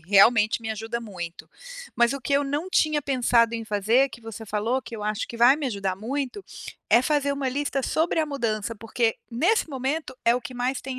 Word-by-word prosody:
realmente 210 +6 +4
me 220 -1 -4
ajuda 225 +2 -4
muito. 175 -7 -8 0.5
Mas 235 +2 +3
o 275 - -5
que 260 - -3
eu 280 +1 +4
não 290 +6 -2
tinha 305 -4 +2
pensado 245 -4 +2
em 230 -1 -4
fazer, 220 +6 +2
que 235 -2 -12
você 225 -1 -8
falou 220 +5 -1
que 230 - -8
eu 210 - -7
acho 215 +1 -2
que 235 - -7
vai 240 +3 +6
me 300 - -3
ajudar 200 -5 -2
muito, 270 - -4 0.5
é 235 - +7
fazer 285 0 +1
uma 280 -1 -2
lista 280 +1 -1
sobre 320 +5 0
a 310 - 0
mudança, 230 -6 -2
porque 225 +1 -1
nesse 335 - +2
momento 270 +1 -3
é 235 - +5
o 250 - -1
que 255 +1 -8
mais 250 +1 -1
tem 260 -1 -6
245 Hz, 215 wpm, -25 LUFS, 220-275 Hz, 0.5 s, é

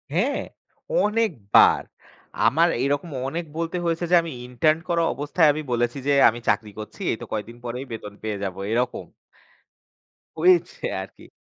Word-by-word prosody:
হ্যাঁ, 245 +11 +1 0.6
অনেকবার। 210 - +3 0.7
আমার 165 +4 +4 0.2
এরকম 145 +4 -1 0.2
অনেক 165 +4 -3
বলতে 165 +2 -2
হয়েছে 170 +1 0
যে - - +7
আমি 165 - -6 0.2
ইন্টার্ন 155 +6 +2
করা 170 -1 +2
অবস্থায় 150 +3 +2
আমি 155 +1 -3
বলেছি 120 +2 0
যে 145 - +4 0.2
"আমি 115 +1 -5
চাকরি 105 -2 0
করছি, 110 - -9
এই - - -2
তো - - -5
কয়েকদিন 110 +2 -4
পরেই 125 +3 -4
বেতন 105 -2 -7
পেয়ে 105 -2 -2
যাব" 95 -2 -3 0.2
এরকম। 125 +2 -1 1.3
হয়েছে 365 -1 +3 0.2
আর - - -7
কি। - - -15
145 Hz, 150 wpm, -24 LUFS, 115-170 Hz, 1.3 s, যে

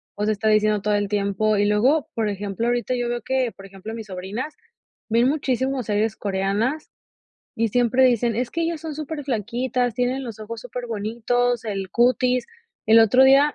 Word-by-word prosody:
pues, 210 +1 -2
está 215 0 +1
diciendo 215 -1 +3
todo 210 +1 0
el 205 0 0
tiempo 205 +1 0
Y 205 - +2
luego, 250 +9 +2
por 225 -2 0
ejemplo, 205 +2 -3
ahorita 245 +1 0
yo 245 -1 -1
veo 240 0 -2
que, 255 0 -1
por 195 - -12
ejemplo, 195 +3 -9
mis 225 -1 -7
sobrinas 200 +10 -5 0.5
ven 230 +2 +3
muchísimo 265 -2 0
series 215 +1 0
coreanas 205 +9 -1 0.7
y 230 +1 +1
siempre 245 +3 +3
dicen: 240 -2 +2
"Es 245 +1 -1
que 335 - -3
ellas 330 -2 -2
son 320 -2 -6
superflaquitas, 255 -4 -2
tienen 250 +3 -1
los 225 -3 -8
ojos 220 +1 -7
superbonitos, 240 +1 -1
el 195 -3 -4
cutis". 250 +1 +2 0.4
El 225 +1 +7
otro 250 +4 +6
día 275 +2 +5
235 Hz, 175 wpm, -23 LUFS, 210-255 Hz, 0.7 s, El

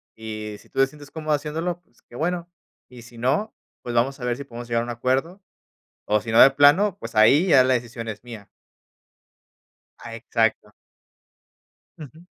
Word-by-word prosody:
Y 110 -1 -7
si - - -21
tú - - -6
te 135 - +5
sientes 145 0 -14
cómodo 155 -1 -2
haciéndolo, 160 +4 -3
pues, 120 - -32
qué - - -17
bueno. 175 +4 -3 0.4
Y 125 -1 -13
si 120 0 -15
no, 135 - -1 0.3
pues, 120 -1 -6
vamos 135 +4 +1
a 125 - -5
ver 120 -1 -1
si 140 - -7
podemos 120 -2 -10
llegar 115 0 0
a - - -3
un - - -8
acuerdo, 135 - -2 0.7
o 105 0 +2
si 115 - -6
no 115 - +4
de 135 - +8
plano, 150 +8 +4
pues, - - -9
ahí 135 - +5
ya 140 -7 +6
la 130 0 +2
decisión 120 -1 -4
es 110 0 -7
mía. 115 -5 -11 1.5
A 115 -1 -9
exacto. 115 -2 -1 1.3
Ujú. 155 +2 -13
125 Hz, 185 wpm, -23 LUFS, 115-150 Hz, 1.5 s, de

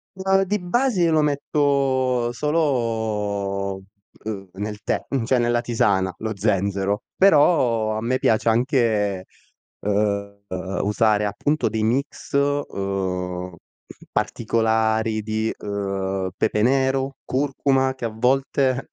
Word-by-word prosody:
Ma 190 0 +2
di 205 +2 -1
base 195 +2 +1
io 165 - +3
lo 155 - +4
metto 135 -4 +1
solo, 110 -9 -1 0.5
uhm, 100 -3 -5
nel 105 +1 -5
tè, - - -1
mhmm, 135 -4 -1
cioè 125 +2 +2
nella 120 0 +1
tisana, 95 -6 +1
lo 110 -1 -4
zenzero, 100 0 0
però 140 - +4
a 110 - -2
me 125 +3 0
piace 110 +1 +2
anche, 110 - +1 0.6
uhm, 100 0 -1 0.4
usare 105 +1 +2
appunto 145 +9 0
dei 110 -1 -2
mix, 135 +7 -2
uhm, 95 -10 -2 0.6
particolari 110 -1 0
di, 110 +1 -1
uhm, 95 -2 -2
pepe 105 - 0
nero, 135 +2 +1
curcuma, 135 -1 0
che 130 - -11
a - - -1
volte 130 +2 +1
115 Hz, 115 wpm, -22 LUFS, 100-135 Hz, 0.6 s, lo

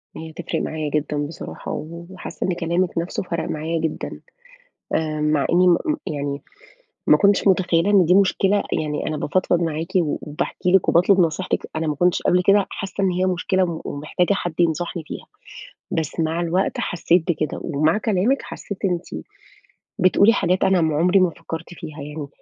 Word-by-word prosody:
هي 160 0 -7
هتفرِق - - -3
معايا 155 -1 -3
جدًا 150 0 -1
بصراحة 165 - -8
و 170 +2 -6
وحاسّة 190 - -6
إن 185 - +1
كلامِك 170 +1 -1
نَفْسه 170 +3 -2
فرَق 170 -2 -3
معايا 160 +2 -2
جدًا، 160 -1 -4 0.7
آآ 155 -1 -1
مع 150 -2 +2
إني 180 +1 +5
م 175 - +5
م 305 - 0
يعني 145 -2 -3 0.7
ما - - +7
كنتش 200 0 +3
متخيّلة 185 0 +3
إن 195 -3 +6
دي 180 - +4
مشكلة، 200 +1 +3 0.2
يعني 150 -1 -3
أنا 155 - -2
بافضفض 175 +2 +1
معاكِ 165 0 -2
و 165 -5 +1
وباحكي 155 +4 -2
لِك 190 - +4
وباطلب 185 +3 +5
نصيحتِك، 170 +2 0
أنا 160 0 -1
ما 150 - 0
كنتش 175 +4 +1
قبل 180 0 +3
كده 200 0 +5
حاسّة 195 0 -3
إن 185 - +3
هي 185 +1 0
مشكلة 185 +1 +1
وم 170 -2 -4
ومحتاجة 155 +6 -1
حد 175 -4 -3
ينصحني 170 +1 0
فيها، - - -8 0.6
بس 165 +1 -2
مع 160 +1 0
الوقت 175 +3 0
حسّيت 175 0 +1
بكده 155 -2 -2
ومع 155 +4 +1
كلامِك 220 +5 +1
حسّيت 200 - -7
أنتِ 180 -2 0 0.9
بتقولي 200 +4 +5
حاجات 185 -3 +1
أنا 190 -2 +3
ما 155 -2 +1
عُمري 180 +4 +4
ما 185 -1 +4
فكّرت 165 +1 -8
فيها 155 -4 -9
يعني، 150 0 -6
170 Hz, 175 wpm, -22 LUFS, 155-185 Hz, 0.9 s, ما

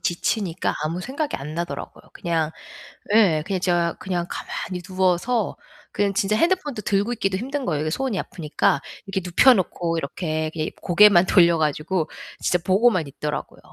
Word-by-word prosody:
지치니까 175 0 -1
아무 165 +3 -2
생각이 280 - -3
안 150 +3 -7
나더라고요. 170 +1 -5
그냥 165 -2 -1 0.6
예 185 -9 +4
그냥 190 -1 -1
제가 175 -2 +1
그냥 175 -2 -2
가만히 180 -1 -5
누워서 185 +5 0 0.4
그냥 200 -1 0
진짜 200 0 +1
핸드폰도 330 - 0
들고 205 +4 +1
있기도 195 -4 -1
힘든 270 +5 -3
거예요 150 -3 -1
이게 155 - -1
손이 260 0 -1
아프니까. 150 -4 0 0.2
이렇게 195 -1 -2
눕혀 185 +9 +6
놓고 175 -4 -1
이렇게 155 +1 -2
예 155 -1 -2
고개만 180 0 +6
돌려 170 -3 +5
가지고 155 +2 -1 0.3
진짜 180 - +1
보고만 190 -2 +3
있더라고요. 150 +2 -5
180 Hz, 370 characters per minute, -23 LUFS, 165-210 Hz, 0.6 s, 눕혀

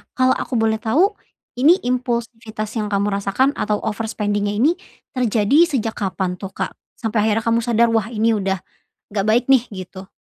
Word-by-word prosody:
Kalau 255 0 +3
aku 260 - -2
boleh 220 -1 +1
tahu 315 - +2 0.5
ini 315 +7 +6
impulsivitas 235 -3 -3
yang 210 - -2
kamu 200 0 0
rasakan 230 +8 +1
atau 210 0 -1
overspending-nya 205 -1 -2
ini 265 +10 +4 0.4
terjadi 250 +6 +3
sejak 225 -3 0
kapan 185 -2 -2
tuh, 195 -1 -8
Kak? - - -2 0.2
Sampai 220 -2 0
akhirnya 220 +1 +1
kamu 230 0 +2
sadar, 235 0 +2
"Wah, 225 -2 +1
ini 225 0 +1
udah 195 -3 -1 0.4
nggak 200 -1 -2
baik 230 +3 +4
nih," 265 -3 +5
gitu. 190 0 -9
220 Hz, 165 wpm, -20 LUFS, 205-240 Hz, 0.5 s, ini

